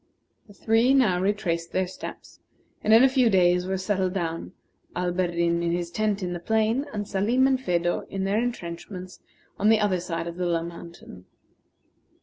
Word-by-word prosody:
The 205 - -16
three 230 +6 +3
now 200 -10 +3
retraced 175 -4 -1
their 185 0 +1
steps, 180 - -10 0.4
and 215 - +1
in 225 +3 +8
a - - +8
few 260 -3 +3
days 180 -2 +3
were 190 0 -1
settled 190 -1 -1
down, 165 -3 -3 0.4
Alberdin 175 -1 0
in 170 0 0
his 175 -1 -3
tent 210 -1 -1
in 180 -1 -2
the 175 - -4
plain, 220 - 0
and 205 -1 -4
Salim 225 +7 +2
and 265 -1 +2
Phedo 175 -5 -1
in 195 0 -3
their 200 +3 +1
intrenchments 185 -4 -6 0.4
on 210 - +3
the 220 -1 +5
other 200 -4 +1
side 170 -1 -4
of 170 0 -6
the 180 -1 -1
low 165 -1 0
mountain. 170 - -11
185 Hz, 175 wpm, -25 LUFS, 175-215 Hz, 0.4 s, in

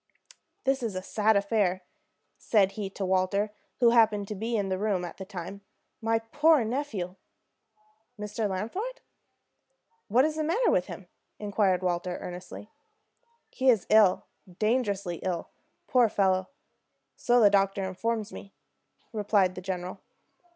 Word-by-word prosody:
"This 270 0 +1
is 225 -5 -3
a 185 - -4
sad 215 +1 +2
affair," 200 -3 +1 0.6
said 200 -4 +3
he 205 -2 -5
to 195 0 -4
Walter, 190 +3 +1 0.3
who 235 -2 +5
happened 215 -4 +3
to - - -2
be 225 +3 -2
in 200 -2 -1
the 185 0 -1
room 200 -4 0
at 170 - -9
the 190 - -7
time. 195 0 -7 0.4
"My 225 0 +2
poor 290 +5 +3
nephew!" 220 -8 -3 1.0
"Mr. 210 +1 -2
Lafond? 375 - -4 1.1
What 250 +6 +4
is 310 0 -2
the 310 - 0
matter 400 +10 +2
with 180 - +1
him?" 190 - -9 0.3
inquired 200 -3 +1
Walter, 175 0 -1
earnestly. 180 +4 -8 0.8
"He 265 0 +2
is 225 -7 +3
ill, 215 -4 +5 0.3
dangerously 205 -6 0
ill, 180 -1 -4 0.3
poor 245 -3 +4
fellow, 190 -2 +1 0.7
so 245 0 +3
the 205 -3 +6
doctor 195 0 +2
informs 215 +3 -2
me," 195 - -11 0.6
replied 205 -3 +2
the 185 - -7
general. 185 0 -5
205 Hz, 140 wpm, -28 LUFS, 185-225 Hz, 1.1 s, the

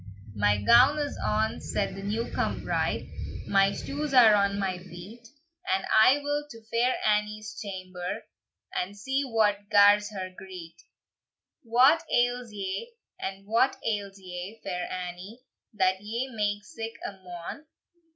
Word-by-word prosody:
"My 105 0 +2
gown 250 - +6
is 290 -1 -2
on," 220 +1 0
said - - -2
the 195 - -7
new 215 +4 -2
come - - -1
bride, - - -1 0.4
"My 195 0 +4
shoes 285 +5 -3
are 230 -4 +8
on 200 -1 +2
my 190 -2 -1
feet, 190 +6 -11 0.4
And 190 +1 +1
I 220 +6 +7
will 290 +1 -1
to 230 -3 -12
Fair 245 +2 +2
Annie's 210 0 0
chamber, 185 -3 -5 0.5
And 195 +3 -3
see 265 +6 -1
what 210 -5 +1
gars 205 0 +6
her 185 -2 -6
greet. 180 -4 -10 0.8
"What 260 +6 +5
ails 245 -1 +1
ye, 205 - -5 0.5
what 230 +5 +2
ails 200 -3 -2
ye, 185 +3 -8
Fair 180 -2 -4
Annie, 185 +6 -7 0.3
That 190 -2 +1
ye 235 +5 -4
make 205 -1 -1
sic 225 0 -6
a - - -3
moan? 185 - -9
210 Hz, 140 wpm, -28 LUFS, 190-235 Hz, 0.8 s, are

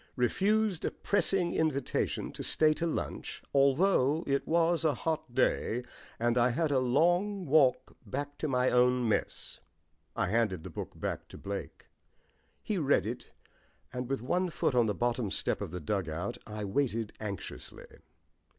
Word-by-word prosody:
Refused 195 - +1
a - - +1
pressing 195 -3 0
invitation 145 -5 -1
to - - -8
stay 155 -1 +3
to 165 +3 -2
lunch, 165 - -4
although 140 +2 +3
it 140 0 0
was 170 +1 +2
a 155 -4 +2
hot 155 -4 -3
day 120 +3 +1 0.3
and 120 +1 +2
I 120 +1 +4
had 155 +4 0
a 135 - +3
long 175 +10 +2
walk 140 -4 +3
back 145 +1 -5
to 155 - -1
my 125 -2 +2
own 125 0 +3
mess." 110 - -2 0.6
I - - +1
handed 105 -6 +1
the - - -8
book - - -7
back - - -3
to - - -11
Blake. 100 0 -6 0.8
He - - -1
read - - +2
it; - - -5 0.6
and 125 0 -4
with 135 -4 -2
one 180 +7 0
foot 155 - 0
on 120 -2 +3
the 105 - -1
bottom 120 -2 0
step - - 0
of - - -3
the 90 +2 -5
dugout 85 -1 -3
I 105 -1 -5
waited 115 0 -1
anxiously. 100 -3 -7
130 Hz, 160 wpm, -31 LUFS, 115-160 Hz, 0.8 s, I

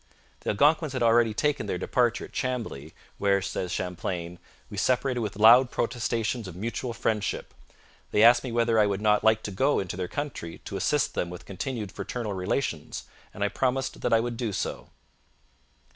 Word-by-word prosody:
The - - -4
Algonquins 150 +6 +3
had 130 - -1
already 115 -1 +4
taken 145 -4 0
their 90 - -1
departure 120 +5 +1
at - - -16
Chambly, 115 - -3 0.2
where, 100 -1 +3
says 95 -2 -3
Champlain, 90 -1 -4 0.3
'we 100 - -9
separated 125 +3 +1
with 105 -3 -3
loud 120 +5 +7
protestations 115 -2 -1
of 90 - -8
mutual 115 +5 -3
friendship. 110 -2 -2 0.6
They 105 - +3
asked 120 +1 +7
me 130 - -4
whether 115 -1 +2
I 105 - +5
would 100 -1 -1
not 105 0 +3
like 110 0 +4
to 105 - -4
go 135 +9 +2
into 95 -3 -2
their 90 -1 -3
country 130 - -5
to - - -6
assist - - +1
them 85 - -2
with 90 0 -9
continued 105 +1 -4
fraternal 115 -2 -4
relations; 90 - -2 0.3
and 100 - -4
I 100 - +2
promised 130 +4 -1
that - - 0
I 115 0 +5
would 120 0 -3
do 115 -3 -2
so.' - - -4
110 Hz, 180 wpm, -27 LUFS, 100-125 Hz, 0.6 s, loud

